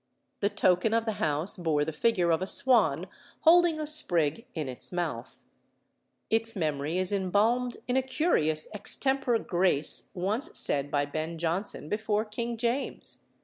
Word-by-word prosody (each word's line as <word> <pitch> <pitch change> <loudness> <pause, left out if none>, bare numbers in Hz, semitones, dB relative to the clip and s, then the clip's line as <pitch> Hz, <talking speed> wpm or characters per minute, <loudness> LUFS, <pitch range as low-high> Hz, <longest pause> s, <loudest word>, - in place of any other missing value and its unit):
The 200 - +1
token 205 +1 +2
of 230 0 0
the 220 - 0
house 155 +6 -1
bore 155 -4 0
the 160 - -3
figure 175 0 +1
of 165 - +1
a 185 - -2
swan 195 - +3 0.4
holding 340 -1 +5
a 305 - -2
sprig 205 - +1
in 155 -4 -3
its 125 -1 +3
mouth. 155 -9 -5 0.9
Its 225 +1 +2
memory 155 -2 -2
is 185 +2 0
embalmed 215 +6 +1
in 250 - 0
a 265 - +3
curious 255 - 0
extempore 265 +4 +1
grace 175 -7 -1
once 210 - -2
said 140 0 +1
by 145 0 0
Ben 155 +3 -5
Jonson 170 0 -3
before 215 +2 -1
King 235 +2 -4
James. 240 +4 -2
195 Hz, 150 wpm, -28 LUFS, 160-235 Hz, 0.9 s, holding